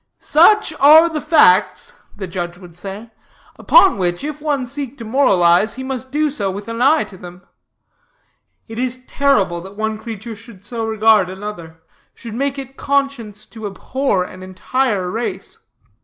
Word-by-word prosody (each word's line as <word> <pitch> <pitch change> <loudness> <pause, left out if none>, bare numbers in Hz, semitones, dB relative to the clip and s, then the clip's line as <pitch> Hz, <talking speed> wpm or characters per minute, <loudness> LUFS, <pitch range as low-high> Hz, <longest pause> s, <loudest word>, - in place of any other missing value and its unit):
"'Such 350 +4 +4
are 310 +4 +7
the 310 -2 -4
facts,' 185 - +3 0.2
the 200 - -5
judge 175 -1 -5
would 175 -3 -14
say, 200 +5 -9 0.5
'upon 390 - +5
which, 175 +4 -1
if 300 0 -6
one 290 -4 -1
seek 275 +1 -6
to 230 - -8
moralize, 200 -5 +3
he 260 - -6
must 260 -1 -5
do 300 +1 0
so 205 -9 -2
with 200 +2 -7
an 230 +1 -5
eye 295 +5 +4
to 190 - -13
them. 180 0 -12 1.2
It 225 0 -7
is 255 0 -3
terrible 200 -14 +1
that 195 +3 -12
one 220 0 -2
creature 225 0 -8
should 205 -2 -16
so 225 0 -4
regard 220 -3 +3
another, 185 -5 -9 0.3
should 230 -3 -9
make 275 +3 -2
it 270 0 -9
conscience 275 -7 -2
to 220 -1 -8
abhor 200 +1 -2
an 185 0 -11
entire 190 +2 -2
race. 225 +6 -5
225 Hz, 160 wpm, -18 LUFS, 190-270 Hz, 1.2 s, are